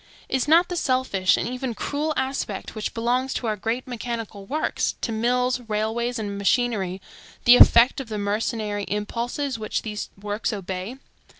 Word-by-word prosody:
Is 265 Hz, +1 st, 0 dB
not 335 Hz, +3 st, +6 dB
the 355 Hz, -, -4 dB
selfish 255 Hz, -, +2 dB
and -, -, -1 dB
even 250 Hz, -1 st, -3 dB
cruel 295 Hz, +7 st, -2 dB
aspect 265 Hz, -7 st, -3 dB
which 215 Hz, -1 st, -4 dB
belongs 250 Hz, +3 st, 0 dB
to -, -, -2 dB
our 215 Hz, -1 st, 0 dB
great 225 Hz, +5 st, -3 dB
mechanical 230 Hz, -4 st, -5 dB
works, 305 Hz, +6 st, -1 dB
to 230 Hz, -, -2 dB
mills, 250 Hz, +3 st, +1 dB
railways, 225 Hz, +3 st, -1 dB
and 200 Hz, -2 st, -4 dB
machinery, 200 Hz, -3 st, +1 dB, 0.5 s
the 245 Hz, +1 st, +9 dB
effect 235 Hz, +4 st, +7 dB
of 250 Hz, -, -10 dB
the 215 Hz, -, -3 dB
mercenary 205 Hz, 0 st, -1 dB
impulses 235 Hz, +5 st, -2 dB
which 215 Hz, -, -2 dB
these 210 Hz, -1 st, -4 dB
works 205 Hz, +1 st, -2 dB
obey? 190 Hz, +3 st, -5 dB
230 Hz, 160 wpm, -24 LUFS, 210-255 Hz, 0.5 s, the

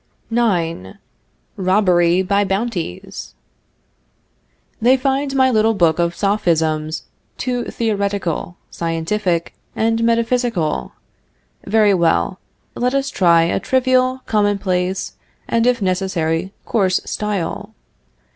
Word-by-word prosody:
IX. 170 Hz, -, 0 dB, 0.6 s
ROBBERY 185 Hz, -2 st, +3 dB
BY 200 Hz, +2 st, +2 dB
BOUNTIES. 195 Hz, -, -4 dB, 1.5 s
They 250 Hz, +4 st, +5 dB
find 270 Hz, +1 st, -1 dB
my 260 Hz, -1 st, +4 dB
little 220 Hz, -1 st, +3 dB
book 170 Hz, -4 st, +2 dB
of 170 Hz, 0 st, 0 dB
Sophisms 160 Hz, -6 st, 0 dB, 0.3 s
too 245 Hz, -1 st, -2 dB
theoretical, 200 Hz, -6 st, -2 dB
scientific, 170 Hz, +1 st, -1 dB, 0.2 s
and 225 Hz, +1 st, +1 dB
metaphysical. 230 Hz, -, 0 dB, 0.7 s
Very 210 Hz, 0 st, +4 dB
well. 175 Hz, +1 st, +1 dB, 0.3 s
Let 250 Hz, +2 st, -1 dB
us 275 Hz, 0 st, 0 dB
try 170 Hz, -3 st, +4 dB
a 170 Hz, -, 0 dB
trivial, 255 Hz, 0 st, +1 dB
commonplace, 195 Hz, -3 st, 0 dB, 0.3 s
and, 230 Hz, +1 st, +1 dB
if 245 Hz, -4 st, +2 dB
necessary, 185 Hz, -2 st, -1 dB
coarse 190 Hz, -5 st, +1 dB
style. 205 Hz, -5 st, -3 dB
200 Hz, 95 wpm, -19 LUFS, 170-230 Hz, 1.5 s, They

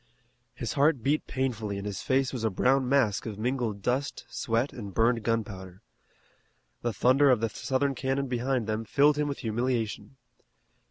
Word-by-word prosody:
His 120 Hz, -2 st, -4 dB
heart 140 Hz, -3 st, +2 dB
beat 150 Hz, +4 st, +1 dB
painfully 115 Hz, -6 st, -2 dB
and 100 Hz, -, -6 dB
his 100 Hz, -2 st, -4 dB
face 135 Hz, 0 st, +1 dB
was 125 Hz, -3 st, -4 dB
a 110 Hz, -, +2 dB
brown 130 Hz, +6 st, +2 dB
mask 120 Hz, -7 st, +2 dB
of 105 Hz, -3 st, -5 dB
mingled 115 Hz, -3 st, -2 dB
dust, 130 Hz, +3 st, -1 dB
sweat, 115 Hz, +4 st, -1 dB
and 100 Hz, -5 st, -8 dB
burned 115 Hz, +1 st, +3 dB
gunpowder. 100 Hz, -4 st, -3 dB, 1.0 s
The 120 Hz, -, -1 dB
thunder 135 Hz, +5 st, +4 dB
of 125 Hz, -4 st, +4 dB
the 115 Hz, 0 st, 0 dB
Southern 135 Hz, +4 st, -1 dB
cannon 135 Hz, +1 st, -1 dB
behind 125 Hz, -1 st, -1 dB
them 110 Hz, +1 st, -2 dB
filled 145 Hz, +6 st, +3 dB
him 150 Hz, -, +1 dB
with 140 Hz, -, -3 dB
humiliation. 115 Hz, -1 st, -2 dB
120 Hz, 165 wpm, -28 LUFS, 110-135 Hz, 1.0 s, thunder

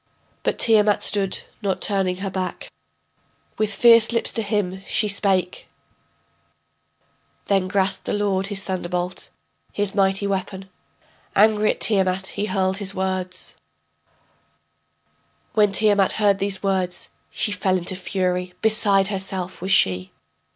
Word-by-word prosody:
But -, -, -1 dB
Tiamat 210 Hz, -2 st, +3 dB
stood, 195 Hz, -2 st, +1 dB, 0.2 s
not 195 Hz, -3 st, -1 dB
turning 195 Hz, -3 st, 0 dB
her 195 Hz, -, -3 dB
back. 185 Hz, -1 st, -5 dB, 0.9 s
With 215 Hz, -1 st, 0 dB
fierce 230 Hz, +1 st, +6 dB
lips 230 Hz, -, 0 dB
to 225 Hz, -, 0 dB
him 200 Hz, -3 st, -2 dB
she 215 Hz, -, 0 dB
spake: 195 Hz, -3 st, 0 dB, 1.8 s
Then 195 Hz, -2 st, +1 dB
grasped 195 Hz, 0 st, -1 dB
the -, -, -1 dB
lord 200 Hz, -2 st, 0 dB
his 200 Hz, -1 st, -1 dB
thunderbolt, 180 Hz, -1 st, -4 dB, 0.4 s
his 205 Hz, -1 st, -2 dB
mighty 195 Hz, 0 st, +1 dB
weapon, 190 Hz, -1 st, -4 dB, 0.6 s
Angry 215 Hz, +1 st, +4 dB
at -, -, -2 dB
Tiamat 190 Hz, -3 st, +1 dB
he 205 Hz, -, -2 dB
hurled 190 Hz, -1 st, 0 dB
his 200 Hz, -1 st, -3 dB
words: 185 Hz, -1 st, -3 dB, 2.0 s
When 210 Hz, -2 st, +3 dB
Tiamat 205 Hz, -1 st, +2 dB
heard 205 Hz, -2 st, +2 dB
these 195 Hz, -1 st, -2 dB
words, 185 Hz, -2 st, -2 dB, 0.2 s
She 210 Hz, -, -2 dB
fell 185 Hz, -1 st, 0 dB
into 180 Hz, +1 st, -3 dB
fury, 180 Hz, -1 st, -2 dB
beside 205 Hz, -3 st, +4 dB
herself 190 Hz, -2 st, -4 dB
was 190 Hz, +2 st, -3 dB
she. 95 Hz, -, +2 dB
195 Hz, 125 wpm, -22 LUFS, 185-205 Hz, 2.0 s, fierce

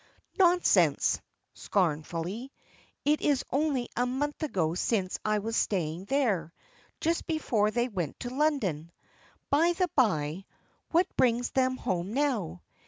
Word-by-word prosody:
"Nonsense!" 355 Hz, -1 st, +4 dB, 0.3 s
scornfully; 175 Hz, -, -2 dB, 0.5 s
"it 300 Hz, +1 st, +2 dB
is 285 Hz, -3 st, +1 dB
only 275 Hz, -4 st, 0 dB
a 245 Hz, +1 st, +1 dB
month 290 Hz, +5 st, -2 dB
ago 180 Hz, -, 0 dB
since 185 Hz, +1 st, -1 dB
I 215 Hz, 0 st, +1 dB
was 225 Hz, +2 st, -3 dB
staying 175 Hz, -4 st, -1 dB
there, 200 Hz, -, 0 dB, 0.5 s
just 335 Hz, +1 st, -1 dB
before 245 Hz, -, +1 dB
they 240 Hz, +3 st, 0 dB
went 180 Hz, -, -4 dB
to 245 Hz, -, -4 dB
London. 230 Hz, -, 0 dB, 0.6 s
By 330 Hz, +5 st, +4 dB
the 360 Hz, +1 st, 0 dB
bye, 185 Hz, -, +1 dB, 0.4 s
what 345 Hz, +2 st, +4 dB
brings 245 Hz, 0 st, +2 dB
them 255 Hz, -1 st, +1 dB
home 185 Hz, 0 st, -2 dB
now? 250 Hz, -, -1 dB
235 Hz, 125 wpm, -29 LUFS, 180-285 Hz, 0.6 s, Nonsense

